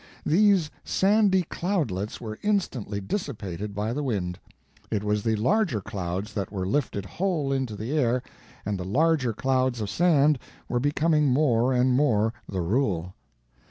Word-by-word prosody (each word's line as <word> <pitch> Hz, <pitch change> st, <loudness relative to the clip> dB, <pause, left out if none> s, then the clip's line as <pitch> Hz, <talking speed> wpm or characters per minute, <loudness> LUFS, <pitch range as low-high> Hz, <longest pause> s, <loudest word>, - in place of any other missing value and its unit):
These 185 Hz, -1 st, +4 dB
sandy 195 Hz, -1 st, +3 dB
cloudlets 150 Hz, -, -2 dB
were 110 Hz, -2 st, -7 dB
instantly 140 Hz, -, -1 dB
dissipated 100 Hz, -, -4 dB
by 105 Hz, +3 st, -1 dB
the 145 Hz, -, -2 dB
wind; 95 Hz, -9 st, -2 dB, 0.5 s
it 105 Hz, -2 st, -1 dB
was 105 Hz, 0 st, 0 dB
the 110 Hz, +1 st, +1 dB
larger 155 Hz, -, +1 dB
clouds 95 Hz, +2 st, -4 dB
that 100 Hz, -3 st, -3 dB
were 95 Hz, -3 st, -3 dB
lifted 100 Hz, -3 st, -1 dB
whole 155 Hz, -, -1 dB
into 130 Hz, -5 st, -2 dB
the 115 Hz, +8 st, -3 dB
air, 125 Hz, -4 st, +1 dB, 0.4 s
and 100 Hz, -1 st, -2 dB
the -, -, -3 dB
larger 140 Hz, -, +2 dB
clouds 130 Hz, +1 st, 0 dB
of 105 Hz, -2 st, -3 dB
sand 150 Hz, -, +3 dB, 0.3 s
were 120 Hz, -, 0 dB
becoming 150 Hz, +2 st, +2 dB
more 130 Hz, -3 st, +3 dB
and 125 Hz, 0 st, +3 dB
more 115 Hz, -5 st, +2 dB, 0.2 s
the 95 Hz, -2 st, -2 dB
rule. 90 Hz, -3 st, 0 dB
125 Hz, 150 wpm, -26 LUFS, 105-150 Hz, 0.5 s, These